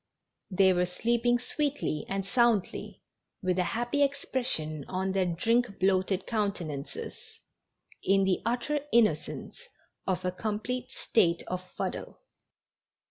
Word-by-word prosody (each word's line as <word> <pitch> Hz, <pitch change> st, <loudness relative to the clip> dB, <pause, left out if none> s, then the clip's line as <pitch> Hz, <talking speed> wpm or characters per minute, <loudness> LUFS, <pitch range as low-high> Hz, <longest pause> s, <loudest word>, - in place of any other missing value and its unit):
They 190 Hz, -1 st, +5 dB
were 180 Hz, 0 st, +2 dB
sleeping 235 Hz, +6 st, +2 dB
sweetly 280 Hz, -, -1 dB
and 195 Hz, 0 st, -1 dB
soundl}'', 235 Hz, -2 st, +1 dB, 0.4 s
with 185 Hz, 0 st, +1 dB
a -, -, +4 dB
happy 240 Hz, +4 st, 0 dB
expression 245 Hz, -, -1 dB
on 190 Hz, +1 st, -1 dB
their 190 Hz, -1 st, +1 dB
drink 225 Hz, +5 st, +1 dB
bloated 190 Hz, 0 st, +2 dB
countenances, 180 Hz, -10 st, -4 dB, 0.6 s
in 195 Hz, 0 st, +4 dB
the 190 Hz, -1 st, +2 dB
utter 245 Hz, +6 st, 0 dB
innocence 215 Hz, -, +1 dB, 0.5 s
of 185 Hz, -1 st, 0 dB
a 180 Hz, -, +1 dB
complete 220 Hz, +6 st, -3 dB
state 175 Hz, -9 st, +2 dB
of 185 Hz, 0 st, -3 dB, 0.2 s
fuddle. -, -, -4 dB
195 Hz, 115 wpm, -29 LUFS, 185-240 Hz, 0.6 s, They